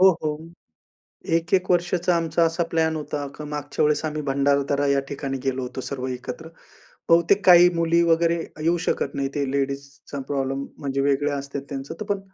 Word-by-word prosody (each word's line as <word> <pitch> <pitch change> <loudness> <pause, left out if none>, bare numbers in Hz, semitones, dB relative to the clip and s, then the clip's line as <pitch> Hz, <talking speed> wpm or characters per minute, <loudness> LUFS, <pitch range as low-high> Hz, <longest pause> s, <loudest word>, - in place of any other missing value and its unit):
हो, 190 0 +8
हो. 150 -1 -1 1.0
1-1 185 +3 0
वर्षाचा 175 0 +2
आमचा 165 0 +1
असा 165 +1 -1
प्लॅन 160 -1 +1
होता 150 -1 -4
का 150 - -8
मागच्या 145 0 -2
वेळेस 150 +1 +1
आम्ही 155 0 -2
भंडारदरा 140 +1 +1
या 140 0 +3
ठिकाणी 135 -1 -4
गेलो 130 -1 -1
होतो, 125 +1 -5
सर्व 130 -1 -4
एकत्र. 125 +5 -6 0.6
बहुतेक 170 +4 +4
काही 175 0 +9
मुली 170 0 +2
वगैरे 170 0 +3 0.3
येऊ 170 +2 +2
शकत - - -1
नाहीत 135 -1 -1
ते 145 -1 0
लेडीजचा 140 +1 -4
प्रॉब्लेम, 135 0 -1
म्हणजे 140 -1 -2
वेगळे 140 +1 +1
असतात 140 0 -4
त्यांचं. 135 -1 -6
तर 215 - -3
पण 200 -2 -1
145 Hz, 170 wpm, -24 LUFS, 140-165 Hz, 1.0 s, काही